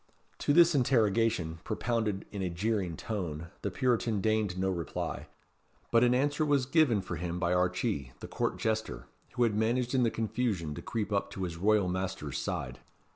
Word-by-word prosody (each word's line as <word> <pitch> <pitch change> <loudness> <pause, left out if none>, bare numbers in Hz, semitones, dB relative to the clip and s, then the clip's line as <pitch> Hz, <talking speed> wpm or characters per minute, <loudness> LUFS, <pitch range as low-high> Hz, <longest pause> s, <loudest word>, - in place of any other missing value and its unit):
To - - +1
this 170 +2 +6
interrogation, 115 - +2
propounded 110 -2 -1
in 100 - -4
a 90 - -1
jeering 90 -2 -1
tone, 85 -7 -4
the 100 - -1
Puritan 115 -1 +1
deigned 110 -2 0
no 95 +1 +1
reply; 85 -4 -4 0.6
but 115 0 +5
an 125 0 +4
answer 145 +4 +1
was 145 -3 +2
given 135 - +3
for 85 -2 -5
him 85 +1 -3
by 90 0 +1
Archee, 90 - 0
the - - -7
court - - -2
jester, 110 0 -2 0.3
who 120 - +2
had 115 -3 +2
managed 120 +4 +1
in 130 - +3
the 120 - +3
confusion 110 -8 -1
to - - -7
creep 105 -2 -3
up 100 0 0
to 95 - -4
his 85 -2 -3
royal 105 +1 +3
master's 90 -6 -3
side. - - -4
105 Hz, 180 wpm, -30 LUFS, 90-120 Hz, 0.6 s, this